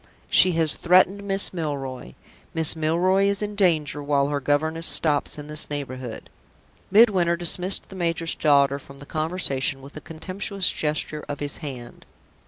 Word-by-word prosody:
She 185 - +6
has 160 -2 +2
threatened 185 +3 +3
Miss 195 -1 +1
Milroy. 135 - -5 0.4
Miss 160 -1 +2
Milroy 175 +5 +1
is 200 +1 0
in 210 0 -4
danger 155 -7 0
while 140 -1 0
her 145 -1 -2
governess 160 +4 -1
stops 150 -2 +1
in 150 - -8
this 150 0 +1
neighborhood." 130 -5 -7 0.6
Midwinter 190 -5 +4
dismissed 180 +2 +2
the 195 - -11
major's 165 -2 -1
daughter 140 -2 +2
from 140 0 -15
the 145 - -11
conversation 155 -4 -1
with 140 +2 -14
a 150 - -8
contemptuous 185 +4 -2
gesture 150 0 -2
of 145 -1 -5
his 145 -1 -1
hand. 130 -6 -9
155 Hz, 155 wpm, -23 LUFS, 145-180 Hz, 0.6 s, She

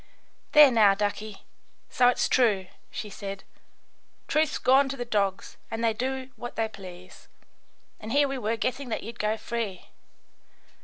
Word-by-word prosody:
"There, 295 -3 +9
now, 210 -4 +5
ducky, 210 0 -3 0.4
so 250 -3 +3
it's 245 - +2
true," 210 -7 +2 0.2
she 215 - -6
said. 195 0 -7 0.8
"Truth's 310 0 +1
gone 270 +2 +4
to 275 - -4
the 245 - -4
dogs 200 -4 -1
and 225 +1 -4
they 225 -1 +3
do 260 +3 -3
what 240 - -7
they 225 -1 0
please, 185 -4 -12 0.7
and 220 - -7
here 285 +2 +4
we 270 -1 -4
were 225 0 -1
guessing 255 +3 -2
that 220 - -3
you'd 230 +2 -9
go 215 +1 0
free. 220 -4 -5
225 Hz, 155 wpm, -27 LUFS, 205-255 Hz, 0.8 s, There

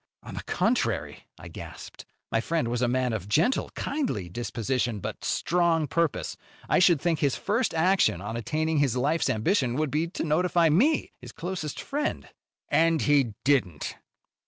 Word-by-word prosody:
"On - - -9
the - - -5
contrary," - - -1
I - - -10
gasped, - - -10 0.2
"my 115 - +2
friend 160 -3 -1
was 120 0 -1
a 125 - +3
man 125 -1 0
of 105 -2 -4
gentle, 165 - +2
kindly 255 - -2
disposition, 120 +2 -2
but - - -6
strong 170 -2 +1
purpose. 145 - -1 0.3
I - - +3
should 175 -4 +5
think 165 +1 0
his 140 -3 +1
first 230 +4 0
action 180 - +3
on 105 +4 -5
attaining 155 +6 -1
his 135 -4 +1
life's 145 +4 +1
ambition 130 - +1
would 150 -1 -1
be 155 +3 0
to 170 - -4
notify 170 +1 +2
me, 265 - +2
his - - -9
closest 175 -4 -5
friend." 295 +2 -3 0.4
"And 165 -1 +3
he 140 -7 +2
didn't." 120 - +1
150 Hz, 160 wpm, -27 LUFS, 120-170 Hz, 0.4 s, should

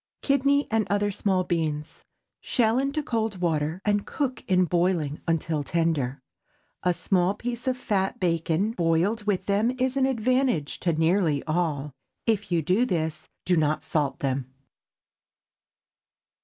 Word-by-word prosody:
KIDNEY 280 +1 +3
AND 220 -1 +1
OTHER 205 0 +1
SMALL 190 -2 +1
BEANS. 160 -4 -3 0.3
Shell 235 -1 +2
into 280 +3 -1
cold 225 -6 -1
water, 160 -1 0
and 205 -1 +2
cook 270 -4 -3
in 185 -1 +3
boiling 170 -4 0
until 165 -2 0
tender. 140 -4 -1 0.6
A 180 - +2
small 180 +2 +1
piece 240 +3 -5
of 255 -1 +1
fat 195 -6 -1
bacon 170 +3 +1
boiled 175 +3 +1
with 205 -3 0
them 205 +3 +2
is 260 +1 +1
an 265 -1 +3
advantage 250 - 0
to 170 -2 +1
nearly 160 -2 +2
all. 155 -4 -1 0.3
If 210 -4 0
you 170 -2 +2
do 185 +10 +2
this, 160 -9 -2 0.2
do 180 - +3
not 155 -1 +1
salt 145 -3 -1
them. 130 -1 -2
180 Hz, 140 wpm, -26 LUFS, 160-225 Hz, 0.6 s, KIDNEY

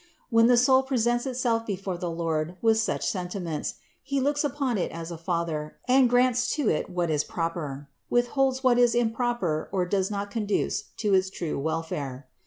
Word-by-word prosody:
When 230 0 +6
the 245 0 +5
soul 260 +2 +5
presents 240 -1 0
itself 240 -3 0
before 195 -2 -3
the 175 0 -4
Lord 165 0 -2
with 225 +1 +3
such 225 - -1
senti 180 0 -3
ments, 165 -5 -3 0.3
He 275 0 -1
looks 290 +2 +1
upon 275 -5 -1
it - - -1
as 165 +1 -6
a - - -4
Father 165 -3 -3
and 255 0 +5
grants 245 0 +3
to 290 -7 +1
it 155 - -1
what 175 -2 -1
is 150 -1 +1
proper, 155 -5 -4 0.2
withholds 260 +2 +1
what 245 -1 +4
is 240 -1 +4
improper 225 -8 0
or 185 -2 +1
does 190 +1 0
not 205 -1 -4
conduce 210 -2 -1
to 210 -3 0
its 190 0 +3
true 170 -6 -4
welfare. 145 -4 -3
205 Hz, 185 wpm, -26 LUFS, 170-245 Hz, 0.3 s, When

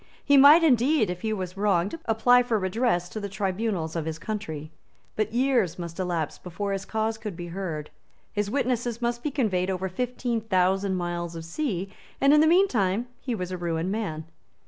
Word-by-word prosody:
He 285 - +5
might 290 +5 +8
indeed, 260 - +3
if 180 0 -6
he 220 - -1
was 185 -3 -4
wronged, 200 - +1
apply 245 +3 +4
for 240 -2 0
redress 190 -2 0
to 215 - -5
the 200 -1 -5
tribunals 195 -4 -2
of 165 -2 -2
his 160 -1 -3
country. 160 -7 -5 0.4
But 215 0 -1
years 240 -8 +1
must 170 0 -7
elapse 175 -5 -2
before 200 +3 -4
his 195 0 -3
cause 220 0 -2
could 210 -4 -6
be 175 -1 -6
heard; 165 -5 -5 0.4
his 205 -1 -1
witnesses 240 -2 -1
must 240 0 -1
be 300 - -1
conveyed 200 -10 0
over 190 0 -2
fifteen 245 +3 -2
thousand 190 -1 +1
miles 175 -1 -3
of 165 -1 -7
sea; 195 - -3 0.3
and 275 +1 +5
in 300 - +6
the 315 - +5
meantime 245 - +2
he 245 -3 -3
was 180 -3 -4
a 185 - -4
ruined 170 +1 -1
man. 160 -8 -3
200 Hz, 190 wpm, -26 LUFS, 180-240 Hz, 0.4 s, might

